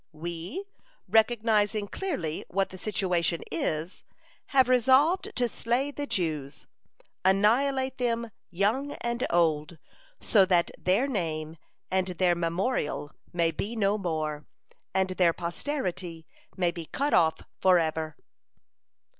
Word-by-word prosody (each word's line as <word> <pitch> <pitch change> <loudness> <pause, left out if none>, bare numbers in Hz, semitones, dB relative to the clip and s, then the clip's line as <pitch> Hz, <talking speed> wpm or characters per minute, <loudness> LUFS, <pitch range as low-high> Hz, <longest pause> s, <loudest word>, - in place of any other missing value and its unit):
We, 170 - -5 0.4
recognizing 215 -2 +2
clearly 270 - -3
what 195 +1 0
the 185 - -9
situation 180 -5 0
is, 160 +2 -2 0.4
have 265 -2 +4
resolved 265 +8 +4
to 245 -1 +2
slay 240 +5 -1
the 285 0 -5
Jews, 155 - -2 0.6
annihilate 260 +8 +2
them, 235 -2 -1 0.2
young 220 +11 0
and 235 +1 -3
old, 160 -1 +1 0.4
so 205 -4 +4
that 180 -2 +2
their 190 +8 +2
name 160 - -3 0.3
and 185 0 +1
their 180 -1 +2
memorial 170 - -1 0.2
may 170 -2 +1
be 215 +7 -4
no 210 -1 +1
more, 155 -5 -3 0.4
and 190 0 +1
their 180 -2 +3
posterity 175 - -4 0.3
may 175 -2 +2
be 170 -2 -7
cut 285 +2 -1
off 160 -2 +3 0.2
forever." 160 -4 +2
190 Hz, 115 wpm, -28 LUFS, 165-235 Hz, 0.6 s, have